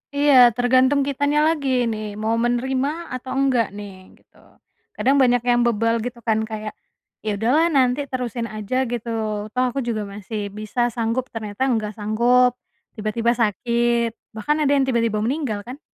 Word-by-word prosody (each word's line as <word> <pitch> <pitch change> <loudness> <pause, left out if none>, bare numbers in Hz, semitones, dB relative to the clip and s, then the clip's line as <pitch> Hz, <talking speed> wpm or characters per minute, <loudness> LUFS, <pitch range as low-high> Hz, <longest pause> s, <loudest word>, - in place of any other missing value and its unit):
Iya 275 -4 +6
tergantung 255 +4 +2
kitanya 285 +2 +1
lagi 265 -6 +1
ini 215 -2 -5
mau 220 +1 0
menerima 265 +7 -1
atau 255 +1 -7
enggak 250 -6 +2
nih 195 -2 -10
gitu, - - -30 0.6
kadang 255 +6 +2
banyak 245 0 +3
yang 240 0 +3
bebal 230 0 +1
gitu 245 0 -6
kan 220 0 +2
kayak, 215 -1 -6 0.5
"Ya 215 - 0
udah 225 +3 +1
lah 325 - +4
nanti 255 +1 +3
terusin 245 -2 -3
aja," 215 +3 -4 0.2
gitu, 235 -1 -4 0.5
"toh 255 - +2
aku 275 - -3
juga 215 -2 -1
masih 210 +2 -6
bisa 215 +3 -6 0.2
sanggup." 235 +2 -2
Ternyata 215 +1 -4
nggak 215 -2 -2
sanggup, 240 +4 +3 0.4
tiba-tiba 225 +2 0
sakit, 235 +1 +1 0.2
bahkan 300 +8 0
ada 285 -2 +2
yang 275 - +3
tiba-tiba 230 -4 +1
meninggal 245 -5 -2
kan. 260 +4 -8
235 Hz, 160 wpm, -22 LUFS, 215-255 Hz, 0.6 s, Iya